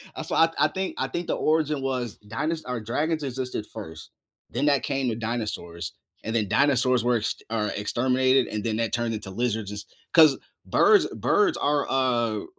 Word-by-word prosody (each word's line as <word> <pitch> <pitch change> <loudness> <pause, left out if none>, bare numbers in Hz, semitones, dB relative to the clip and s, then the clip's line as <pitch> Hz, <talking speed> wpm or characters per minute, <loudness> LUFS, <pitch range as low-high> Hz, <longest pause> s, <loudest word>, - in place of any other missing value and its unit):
Uh, - - -4
so - - -6
I 165 - +6
I - - +4
think 190 0 -3
I - - -1
think 175 0 -4
the - - 0
origin 155 -2 +1
was 125 -5 -3
dinos 155 +10 -2
or 125 -1 -3
dragons 150 +8 -1
existed 130 -4 -4
first, 80 -9 -10 0.4
then 135 +5 -1
that 140 -2 +3
came 135 -2 -1
to 115 - -2
dinosaurs. 110 -7 -4 0.3
And 110 - -3
then 110 -3 +1
dinosaurs 130 0 +3
were 120 -1 +2
ext 105 - -3
or 110 -2 -1
exterminated, 130 +4 +2
and 105 -1 -4
then 110 -2 -1
that 115 -1 -1
turned 120 -1 0
into 105 -3 -6
lizards 110 -1 -1
just 105 0 -9 0.2
'cause 155 -5 +7 0.3
birds 415 -1 +5
birds 390 -6 +1
are, 145 0 +1
uh, 120 -4 +1
125 Hz, 185 wpm, -25 LUFS, 110-140 Hz, 0.4 s, cause